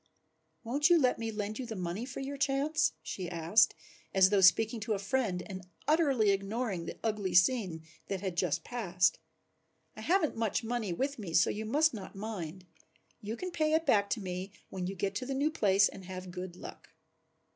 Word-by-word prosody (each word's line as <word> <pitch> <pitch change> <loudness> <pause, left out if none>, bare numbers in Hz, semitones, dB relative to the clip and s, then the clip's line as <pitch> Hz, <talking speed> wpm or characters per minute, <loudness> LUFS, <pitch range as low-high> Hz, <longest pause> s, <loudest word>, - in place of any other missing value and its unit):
"Won't 285 +8 +2
you 345 - +7
let 255 -5 +2
me 225 0 -2
lend 210 +1 -4
you 255 - -4
the 225 - -5
money 180 +4 -3
for 270 +1 -6
your 275 +1 -4
chance?" 280 - +1
she 175 +2 -5
asked, 175 +6 +3 0.4
as 190 0 +6
though 200 -2 +4
speaking 220 +5 +5
to 215 +1 -1
a - - 0
friend 195 -3 -1
and 190 -2 -8 0.2
utterly 275 -10 +3
ignoring 195 -2 -2
the - - -6
ugly 205 -5 -1
scene 180 -4 +3 0.2
that 195 - -2
had 190 -2 -4
just 165 -3 0
passed. 180 -8 +1 0.8
"I 215 - -9
haven't 335 - +2
much 225 +1 -1
money 225 -4 -2
with 270 +9 -2
me, 175 -6 -4
so 175 - +5
you 215 +1 -4
must 300 +7 +3
not 200 -4 -8
mind. 190 -4 -6 0.6
You 215 +3 -5
can 365 0 -5
pay 310 -2 +1
it 320 +1 +2
back 200 -1 +3
to 230 - -1
me 185 0 -5 0.2
when 185 -1 -3
you 195 - -4
get 195 +2 -2
to 255 - -4
the 270 - -2
new 290 +3 +1
place 200 -8 +4
and 190 - -10
have 185 0 -7
good 180 0 -6
luck." - - -11
210 Hz, 200 wpm, -31 LUFS, 185-255 Hz, 0.8 s, you